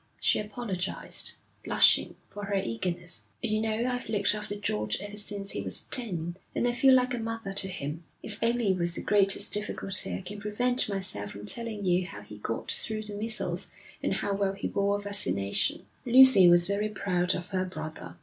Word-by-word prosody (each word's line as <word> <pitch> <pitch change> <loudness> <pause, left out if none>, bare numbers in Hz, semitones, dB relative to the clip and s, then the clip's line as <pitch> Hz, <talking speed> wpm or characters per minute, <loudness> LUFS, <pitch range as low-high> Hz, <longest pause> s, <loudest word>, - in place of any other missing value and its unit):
She - - +2
apologised, 205 -3 -1 0.3
blushing, - - +4 0.2
for 205 0 -6
her 200 0 -2
eagerness. 170 - 0 0.2
'You 215 0 0
know, 220 +1 0
I've 250 -2 -3
looked 205 -2 +2
after 210 -1 -4
George 105 - -1
ever 205 +2 -7
since 205 -1 -5
he 100 - -4
was 95 -2 -4
ten, 175 -8 -2 0.2
and 245 - +1
I - - +3
feel 260 +2 +5
like 250 0 +2
a 240 - -2
mother 225 -3 -4
to 195 0 -1
him. 160 -3 -5 0.2
It's 210 0 +2
only 230 -3 +2
with 175 -2 -1
the - - -3
greatest 200 0 +2
difficulty 195 - +1
I 90 - -5
can 205 +1 -8
prevent 245 +4 +1
myself 190 - -2
from 100 +1 -9
telling 220 - -3
you 180 0 +2
how 100 - -9
he 105 0 -12
got 115 +2 -3
through 215 -1 -1
the 210 -1 -7
measles, 215 +2 -2 0.3
and - - 0
how 200 - -1
well 195 -1 0
he 195 - -4
bore 200 0 0
vaccination.' 105 - -1 0.2
Lucy 245 -7 +8
was 175 0 +6
very 200 +3 -1
proud 180 -3 0
of 180 +1 -6
her 185 -2 -1
brother. 155 - -7
200 Hz, 190 wpm, -28 LUFS, 175-215 Hz, 0.3 s, Lucy